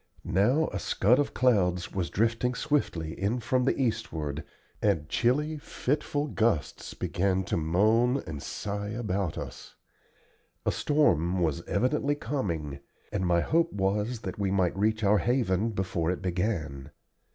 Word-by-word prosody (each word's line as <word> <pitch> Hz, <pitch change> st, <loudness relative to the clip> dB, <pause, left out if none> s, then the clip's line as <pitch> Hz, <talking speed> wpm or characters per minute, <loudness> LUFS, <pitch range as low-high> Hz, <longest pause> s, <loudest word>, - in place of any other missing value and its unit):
Now 125 Hz, -, +3 dB
a 100 Hz, -, -4 dB
scud 115 Hz, +8 st, +3 dB
of 145 Hz, -, -1 dB
clouds 90 Hz, -8 st, +2 dB
was 90 Hz, -3 st, -1 dB
drifting 115 Hz, +3 st, +1 dB
swiftly 105 Hz, -, -1 dB
in 105 Hz, +6 st, +1 dB
from 125 Hz, +2 st, +1 dB
the 135 Hz, -, +1 dB
eastward, 85 Hz, -, -2 dB, 0.4 s
and 75 Hz, -1 st, +1 dB
chilly, 150 Hz, -, +1 dB
fitful 145 Hz, +1 st, -1 dB
gusts 115 Hz, -, -1 dB
began 95 Hz, +1 st, 0 dB
to -, -, -2 dB
moan 110 Hz, -, +2 dB
and 75 Hz, -3 st, -6 dB
sigh 100 Hz, +5 st, -4 dB
about 100 Hz, -6 st, -2 dB
us. -, -, -8 dB, 0.9 s
A -, -, +3 dB
storm 95 Hz, -, +2 dB
was 80 Hz, 0 st, 0 dB
evidently 140 Hz, +6 st, +1 dB
coming, 85 Hz, -, -3 dB, 0.3 s
and 95 Hz, -3 st, -1 dB
my 85 Hz, -1 st, +3 dB
hope 165 Hz, -, +2 dB
was 105 Hz, +4 st, -1 dB
that 95 Hz, -1 st, -6 dB
we 100 Hz, -1 st, +1 dB
might 95 Hz, -2 st, +1 dB
reach 110 Hz, +2 st, +1 dB
our 100 Hz, +1 st, +4 dB
haven 115 Hz, -2 st, +1 dB
before 95 Hz, -5 st, -1 dB
it 90 Hz, +1 st, -2 dB
began. 85 Hz, -7 st, -2 dB
100 Hz, 140 wpm, -28 LUFS, 90-125 Hz, 0.9 s, our